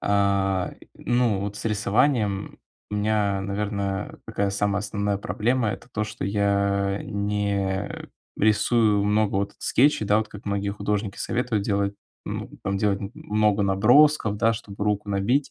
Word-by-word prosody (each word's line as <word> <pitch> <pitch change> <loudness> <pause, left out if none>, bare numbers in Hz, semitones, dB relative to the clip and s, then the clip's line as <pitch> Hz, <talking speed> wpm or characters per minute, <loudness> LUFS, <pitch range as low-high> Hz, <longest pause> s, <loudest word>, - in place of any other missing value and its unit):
а, 100 -2 +1
и, - - -17
ну 120 -5 +1
вот 100 +1 -4
с - - -7
рисованием 105 -1 +1 0.3
у - - -3
меня, 105 -1 +1
наверно, 100 0 -3
такая 100 -3 -1
самая 100 0 0
основная 100 0 -1
проблема- 115 +3 0
это - - -10
то, 110 - -1
что 105 - -6
я 100 0 +1
не 100 -1 -1 0.5
рисую 110 0 +3
много 105 0 +2
вот 100 0 -1
скетчей. 135 -4 +2
Да, 105 +1 +4
вот 110 - -2
как 105 - -11
многие 100 0 -1
художники 100 0 -2
советуют 115 -4 -1
делать, 100 -1 0 0.3
ну - - -5
там, 100 +1 -1
делать 100 -1 +1
м 100 0 -5
много 105 -1 +1
набросков, 110 +4 +4
да, 115 +2 +3
чтобы 105 -2 -6
руку 105 0 -1
набить. 100 +8 +1
105 Hz, 150 wpm, -25 LUFS, 100-110 Hz, 0.5 s, Да